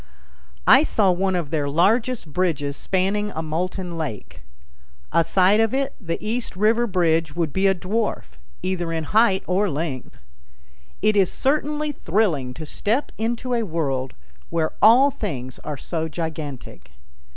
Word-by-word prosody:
I - - +8
saw 210 -10 +2
one 190 +1 0
of 170 -5 -3
their 145 -3 0
largest 210 - +1
bridges 145 -6 0
spanning 195 +5 0
a 160 - -3
molten 175 +2 -3
lake. 135 -11 -6 0.7
Aside 185 +5 +3
of 225 +2 +2
it 275 0 -1
the 165 -3 -3
East 225 +1 -3
River 225 +4 +2
bridge 165 -5 +1
would 165 -4 -1
be 195 +1 +2
a 195 - +3
dwarf, 210 +5 -3 0.2
either 175 -3 -2
in 165 -1 -2
height 205 +3 +3
or 195 +3 +1
length. 145 -4 -4 0.9
It 215 - +3
is 195 -3 +3
certainly 300 +2 0
thrilling 165 - 0
to 160 - -7
step 220 - -1
into 240 +3 -2
a 235 - +1
world 145 - -2 0.3
where 160 -1 -1
all 250 +6 +7
things 140 - -5
are 150 -2 -6
so 160 +3 -3
gigantic. 150 - -6
180 Hz, 145 wpm, -23 LUFS, 160-220 Hz, 0.9 s, I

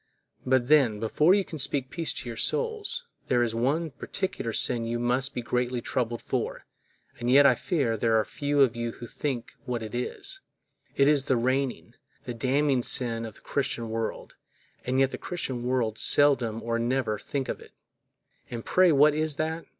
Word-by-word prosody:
But 130 -2 +2
then, 130 -8 +4
before 150 - +3
you 200 -2 +1
can 160 - -8
speak 130 0 +1
peace 165 -2 -2
to - - -6
your 115 - -5
souls, 455 - -2 0.2
there 120 -1 +3
is 115 -2 -1
one 145 +8 0
particular 180 -4 -4
sin 115 +1 +2
you 115 +1 -2
must 125 +3 0
be 125 - -3
greatly 125 +1 -1
troubled 120 -1 -2
for, - - -3 0.5
and 120 0 -2
yet 140 +3 +7
I - - +7
fear 140 -10 -1
there 110 0 +2
are - - 0
few 145 0 0
of 130 -3 +4
you 120 0 -3
think 120 +1 -5
what 120 -2 -3
it 110 - -7
is; 385 - -4 0.6
it 140 - +4
is 145 -2 +3
the 130 - +2
reigning, 130 +2 -1 0.3
the 120 - -5
damning 130 +3 +1
sin 115 -2 0
of 110 - -11
the - - -18
Christian 130 -5 -2
world, 115 0 -4 0.5
and 130 +1 0
yet 135 0 +3
the - - -6
Christian 135 -9 -4
world 115 -4 0
seldom 125 -6 +3
or 115 0 -1
never 120 -3 0
think 135 -2 -3
of - - -4
it. - - -15 0.8
And 115 -2 -6
pray 185 -1 +4
what 150 +1 +5
is 155 -1 0
that? 160 +2 -3
130 Hz, 185 wpm, -27 LUFS, 115-145 Hz, 0.8 s, yet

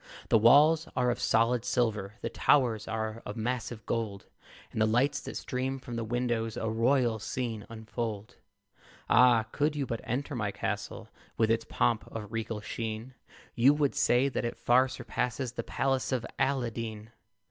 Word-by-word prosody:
The - - +6
walls 150 +8 +6
are 125 -1 +2
of - - -3
solid 115 +1 +2
silver; 110 -5 -1
The - - -2
towers 120 -6 +2
are 110 0 -3
of 105 - -6
massive 115 -1 -3
gold; 105 -4 -3 0.5
And 110 - -2
the 110 - +4
lights 125 +6 +2
that - - -6
stream 130 +1 -2
from 125 -2 -8
the 115 - -2
windows 115 -1 -1
A 110 - -2
royal 115 0 +2
scene 110 -1 -4
unfold. 110 -1 -5 0.7
Ah! 125 -3 +6
could 150 +1 0
you 145 -2 -1
but 115 -2 -4
enter 140 +5 -3
my 105 -5 -1
castle - - -4 0.3
With 110 -1 +3
its 115 0 0
pomp - - +1
of 105 -2 -7
regal 115 -1 -3
sheen, 110 +3 -5 0.4
You 135 +5 +5
would 145 -2 +1
say 125 +3 +3
that 135 - -2
it 120 - -3
far 125 +2 +4
surpasses 125 -1 -3
The 125 - -4
palace 135 0 -1
of 125 -3 -1
Aladeen. 115 -5 -2
115 Hz, 165 wpm, -29 LUFS, 110-130 Hz, 0.7 s, The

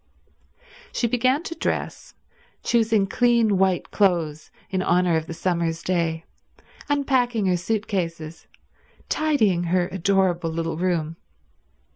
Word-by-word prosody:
She - - -1
began 255 +6 +1
to 330 - -5
dress, - - -4 0.5
choosing 225 -3 +2
clean 230 -2 +2
white 190 -2 +1
clothes 165 -6 +1 0.2
in 190 -1 0
honour 180 -1 +2
of 160 0 -1
the 165 - -5
summer's 170 -2 -1
day, 165 -3 -1 0.6
unpacking 255 -6 +1
her 185 -1 +2
suit 210 +5 -2
cases, 165 -4 -4 0.6
tidying 220 - +1
her 175 +1 +1
adorable 190 -2 +1
little 165 0 -3
room. 165 -3 -1
185 Hz, 115 wpm, -23 LUFS, 165-225 Hz, 0.6 s, choosing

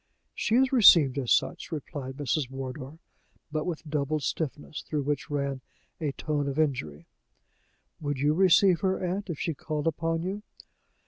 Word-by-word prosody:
"She 220 - 0
is 260 +1 +4
received 165 - +7
as 125 -3 -2
such," 175 - +1
replied 140 -3 -6
Mrs. 145 -2 -1
Wardour, 135 +2 -7 0.5
but 155 +1 -2
with 165 -2 -4
doubled 150 0 -1
stiffness, 150 0 -3
through 150 -2 -3
which 145 +2 -2
ran 140 -2 -2 0.4
a 155 -4 -1
tone 145 -1 -2
of 140 0 -3
injury. 85 - -1 0.9
"Would 145 -2 -2
you 145 +3 +2
receive 185 0 +5
her, 190 -1 0
aunt, 190 +3 -3
if 165 - -3
she 165 - -2
called 150 0 -4
upon 165 +1 0
you?" 195 +3 -3
150 Hz, 155 wpm, -28 LUFS, 140-165 Hz, 0.9 s, received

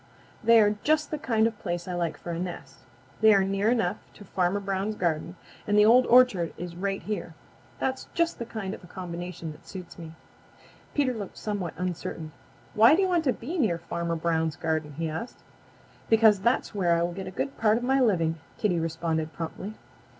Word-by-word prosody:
They 230 0 +7
are 210 -1 +3
just 310 0 +1
the 305 - -2
kind 225 -5 +2
of 225 - +1
a - - -25
place 175 -1 -3
I 180 - -3
like 170 -2 -2
for 175 - -7
a 165 - -3
nest. 175 -6 -6 0.4
They 220 -1 +7
are 195 - +4
near 195 +2 +1
enough 225 -7 +1 0.2
to 205 - -12
Farmer 185 +1 0
Brown's 195 +2 -2
garden, 170 -1 -1 0.3
and 205 0 +2
the 210 - +7
Old 245 +3 +6
Orchard 240 -9 +4
is 175 0 -6
right 195 +2 -2
here. 180 -6 -4 0.4
That's 265 0 -2
just 335 0 +1
the 235 - -3
kind 205 -4 -4
of - - -10
a - - -12
combination 175 -2 -6
that 150 - -15
suits 185 -2 -9
me." 160 -1 -8 0.8
Peter 275 -3 +2
looked 210 -4 -7
somewhat 200 -6 -3
uncertain. 170 -3 -4 0.4
"Why 225 +7 +7
do 390 - +2
you - - +2
want 345 -3 +1
to 260 - +4
be 325 +9 -5
near 205 - +2
Farmer 170 0 -3
Brown's 160 -1 0
garden?" 155 -2 -2
he 165 +3 -3
asked. 160 +10 -6 0.7
"Because 220 -3 +6
that 235 +6 +2
is - - -13
where 175 -4 +2
I 170 - +1
will 175 0 -2
get 190 +1 -6
a - - -3
good 270 +9 -3
part 220 0 +4
of 240 - -4
my 265 +2 +2
living," 165 -8 +2 0.2
Kitty 180 -5 +1
responded 160 -1 -2
promptly. 185 +5 -6
190 Hz, 210 wpm, -27 LUFS, 170-225 Hz, 0.8 s, They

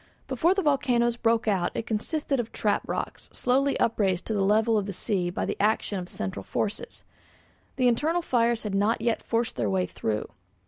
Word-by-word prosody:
Before 295 +8 +2
the 390 - 0
volcanoes 245 -5 +2
broke 230 -1 +1
out 190 -4 +2
it - - -2
consisted 275 +5 -1
of 230 -2 -3
trap - - +1
rocks - - -4
slowly 270 +3 +1
upraised 195 -6 +1
to 220 - -2
the 205 - +1
level 220 +3 +3
of 205 -2 0
the 200 - -4
sea 185 -2 -1
by 175 - -2
the - - -2
action 210 -1 +1
of 180 0 -7
central 95 +1 -4
forces. 215 - -4 0.7
The 255 -2 +3
internal 310 +9 +1
fires 235 -4 +1
had 210 -2 -3
not 205 +4 +2
yet 230 -1 0
forced 230 0 -1
their 115 -4 0
way 95 -1 +1
through. 105 +3 -3
225 Hz, 190 wpm, -27 LUFS, 195-245 Hz, 0.7 s, level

